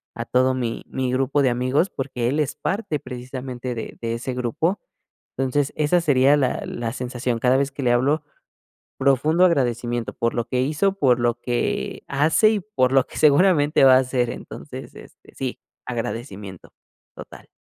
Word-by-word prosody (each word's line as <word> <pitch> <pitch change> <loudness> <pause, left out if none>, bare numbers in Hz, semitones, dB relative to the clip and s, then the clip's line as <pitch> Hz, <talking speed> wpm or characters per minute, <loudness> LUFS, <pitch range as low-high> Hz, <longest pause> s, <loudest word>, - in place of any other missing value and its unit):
a - - -4
todo 130 +1 +2
mi 120 -3 -3
mi 130 -1 -2
grupo 135 +2 +1
de 130 - +3
amigos, 130 +9 +1
porque 130 -3 -3
él 140 +5 0
es 145 - -2
parte 195 -8 -2
precisamente 125 0 -6
de 115 - -7
de 115 -1 -2
ese 125 +2 -4
grupo. 125 - -1 0.6
Entonces, 135 +2 0
esa 155 +4 +2
sería 145 -2 +4
la 130 -3 0
la 115 0 -4
sensación. 125 -1 -3
Cada 125 +2 +3
vez 140 0 0
que 140 0 -6
le 120 - +3
hablo, 140 +6 +2 0.8
profundo 145 +6 +3
agradecimiento 120 -7 0
por 115 - -1
lo 120 0 -1
que 125 - 0
hizo, 155 +8 +1
por 125 -3 +3
lo 120 0 0
que 120 -1 -2
hace 155 +10 +3
y 220 - +1
por 175 -11 0
lo 135 -1 +3
que - - -13
seguramente 150 -2 +4
va 130 -1 +8
a - - +7
hacer. 125 -2 0
Entonces, - - -9
este - - -16
sí, 130 -2 -4 0.3
agradecimiento. 115 -6 -6 0.4
Total. - - -12
130 Hz, 170 wpm, -22 LUFS, 120-145 Hz, 0.8 s, va